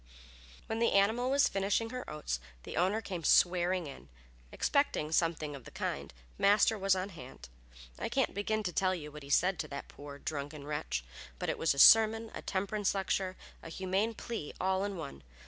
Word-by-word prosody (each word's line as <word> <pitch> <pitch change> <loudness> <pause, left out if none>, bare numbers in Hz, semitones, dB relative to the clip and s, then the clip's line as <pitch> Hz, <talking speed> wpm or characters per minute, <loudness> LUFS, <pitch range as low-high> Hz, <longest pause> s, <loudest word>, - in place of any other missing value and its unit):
When 225 - -3
the 230 - +2
animal 220 +6 +3
was 280 +1 +4
finishing 205 +3 0
her 255 0 -6
oats 150 - -3 0.2
the - - -7
owner 190 +5 +1
came 180 -6 -5
swearing 180 +1 +3
in. 140 - -10 0.4
Expecting 280 - 0
something 160 -3 0
of 135 - -10
the - - -11
kind, - - -4 0.3
Master 205 +2 +4
was 195 -2 +2
on 185 +1 -3
hand. 125 - -11 0.5
I - - -2
can't - - +1
begin 215 +2 -1
to 180 -3 -3
tell 185 +1 +2
you 150 -3 -7
all 150 - -8
he 140 - -11
said 180 +4 +2
to 155 - -3
that 140 -1 -7
poor, 145 0 -10
drunken 145 0 -5
wretch, 150 - -3 0.3
but - - -3
it - - -1
was 160 -3 +2
a - - -11
sermon, 225 +6 +7
a - - -6
temperance 200 +1 -1
lecture, 190 -1 -1 0.2
and 165 - -9
a - - -8
humane 195 +4 0
plea 220 -12 -5
all 190 +1 +1
in 200 -2 -3
one. 140 - -7
185 Hz, 195 wpm, -32 LUFS, 150-205 Hz, 0.5 s, sermon